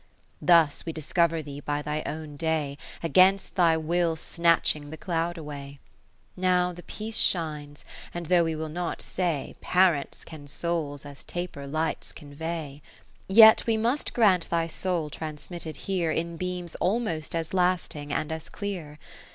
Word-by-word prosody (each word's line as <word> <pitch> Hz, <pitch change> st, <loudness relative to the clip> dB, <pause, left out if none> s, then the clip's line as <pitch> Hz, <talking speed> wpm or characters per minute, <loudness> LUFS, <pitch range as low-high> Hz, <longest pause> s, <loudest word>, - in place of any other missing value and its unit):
Thus 165 Hz, -4 st, +4 dB
we 165 Hz, -, -4 dB
discover 165 Hz, +1 st, +1 dB
thee 145 Hz, -1 st, -7 dB
by 145 Hz, 0 st, -2 dB
thy 150 Hz, +1 st, -2 dB
own 155 Hz, -1 st, -5 dB
day, 150 Hz, -2 st, -1 dB, 0.2 s
Against 185 Hz, +4 st, +4 dB
thy 170 Hz, -3 st, +4 dB
will 165 Hz, +1 st, +1 dB
snatching 165 Hz, -3 st, +1 dB
the 160 Hz, -, -7 dB
cloud 170 Hz, 0 st, -2 dB
away. 145 Hz, -3 st, -8 dB, 0.6 s
10 -, -, -10 dB
Now 180 Hz, -1 st, +3 dB
the 175 Hz, -, -10 dB
piece 220 Hz, +4 st, -4 dB
shines, 150 Hz, -4 st, 0 dB, 0.3 s
and 175 Hz, 0 st, -5 dB
though 175 Hz, +1 st, +4 dB
we 160 Hz, -1 st, -1 dB
will 160 Hz, +1 st, -3 dB
not 170 Hz, +2 st, -3 dB
say, 170 Hz, -7 st, -2 dB
Parents 180 Hz, -6 st, +2 dB
can 155 Hz, -3 st, -10 dB
souls, 145 Hz, -2 st, -3 dB
as 140 Hz, -1 st, -10 dB
taper 175 Hz, -6 st, -5 dB
^ -, -, -8 dB
lights, 160 Hz, +1 st, -2 dB
convey; 150 Hz, -1 st, -6 dB, 0.5 s
Yet 220 Hz, +4 st, +8 dB
we 225 Hz, -1 st, +3 dB
must 240 Hz, +6 st, 0 dB
grant 195 Hz, -7 st, +4 dB
thy 165 Hz, -1 st, +1 dB
soul 165 Hz, -2 st, -2 dB
trans 150 Hz, 0 st, -7 dB
mitted 160 Hz, -4 st, -6 dB
here 180 Hz, -4 st, 0 dB
In 170 Hz, +1 st, -1 dB
beams 180 Hz, 0 st, -4 dB
almost 180 Hz, -6 st, -1 dB
as 165 Hz, +1 st, -3 dB
lasting 180 Hz, -5 st, 0 dB
and 155 Hz, +2 st, -1 dB
as 160 Hz, 0 st, -5 dB
clear. 180 Hz, -8 st, -5 dB
165 Hz, 160 wpm, -27 LUFS, 150-180 Hz, 0.6 s, Yet